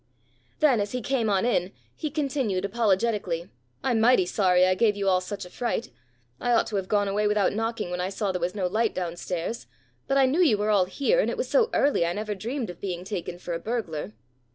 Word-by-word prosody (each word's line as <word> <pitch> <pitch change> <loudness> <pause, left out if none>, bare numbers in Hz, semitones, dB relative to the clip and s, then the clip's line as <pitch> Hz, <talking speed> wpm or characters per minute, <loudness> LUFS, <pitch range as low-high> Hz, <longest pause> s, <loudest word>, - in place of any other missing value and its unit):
Then 265 -8 +4
as 205 +3 -3
he 250 - -2
came 245 -4 0
on 195 +1 +2
in, 190 -6 0 0.2
he 310 - -3
continued, 265 - -1
apologetically, 200 -5 0 0.3
"I'm 245 -4 +2
mighty 230 -4 +5
sorry 180 -1 +3
I 185 - +3
gave 210 +2 +2
you 200 -1 -2
all 185 -1 +3
such 195 +1 -6
a - - -11
fright. 240 -1 -2 0.5
I 245 - -2
ought 230 - +4
to 210 - -2
have 190 -1 -3
gone 205 0 +1
away 210 +2 +1
without 210 -1 +2
knocking 225 -4 -2
when 180 0 -2
I 185 - -1
saw 200 0 -2
there 180 -1 -3
was 175 +3 -1
no 195 -3 -1
light 215 +4 0
down 175 -2 -3
stairs, 175 - -4 0.4
but 275 - +2
I 270 - +6
knew 285 +8 +2
you 255 -12 +4
were 210 +1 0
all 195 -3 +4
here, 280 - +1
and - - +2
it - - -3
was - - -2
so 470 -2 +3
early, 280 -10 +2
I 170 +1 0
never 210 +2 -3
dreamed 225 +2 -4
of 175 - -15
being 180 -3 -4
taken 180 -3 -5
for 175 -1 -5
a 165 - -2
burglar." 170 - -4
205 Hz, 235 wpm, -26 LUFS, 185-235 Hz, 0.5 s, I